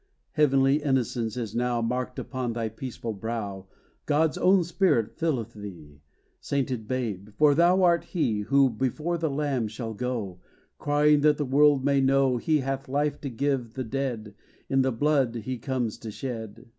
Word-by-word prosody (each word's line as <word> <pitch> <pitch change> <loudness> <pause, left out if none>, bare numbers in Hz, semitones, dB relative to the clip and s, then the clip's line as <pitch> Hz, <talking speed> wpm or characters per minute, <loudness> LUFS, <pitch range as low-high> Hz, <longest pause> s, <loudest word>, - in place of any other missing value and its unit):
Heavenly 135 -1 +3
innocence 125 -5 -1
is 115 -4 -4
now 120 0 0
Marked 125 +2 -2
upon 130 -3 -3
thy 115 -1 -2
peaceful 115 0 -6
brow: 100 -3 -5 0.4
God's 150 +1 +2
own 185 0 +4
Spirit 170 - +1
filleth 125 -9 -2
thee, 85 -9 -11 0.4
Sainted 130 -5 -2
babe; 110 -6 -3
for 150 -1 +5
thou 175 +5 +4
art 170 -1 +3
he, 120 - -1
Who 135 +5 +3
before 150 +9 -2
the 160 -1 0
Lamb 135 -5 -1
shall 110 +1 -6
go, 110 -6 -4 0.4
Crying, 145 0 +3
that 150 0 +4
the 145 - -1
world 140 0 +4
may 140 -1 +3
know 135 -1 +3
He 155 +4 +1
hath 135 0 -4
life 145 +1 -1
to 140 - -4
give 125 -2 -2
the 130 - -2
dead, 120 -4 -3 0.4
In 135 0 +3
the 130 0 +1
blood 135 -1 +1
he 120 +2 -4
comes 125 -3 -2
to 110 - -7
shed! 115 -1 -6
130 Hz, 165 wpm, -26 LUFS, 115-145 Hz, 0.4 s, for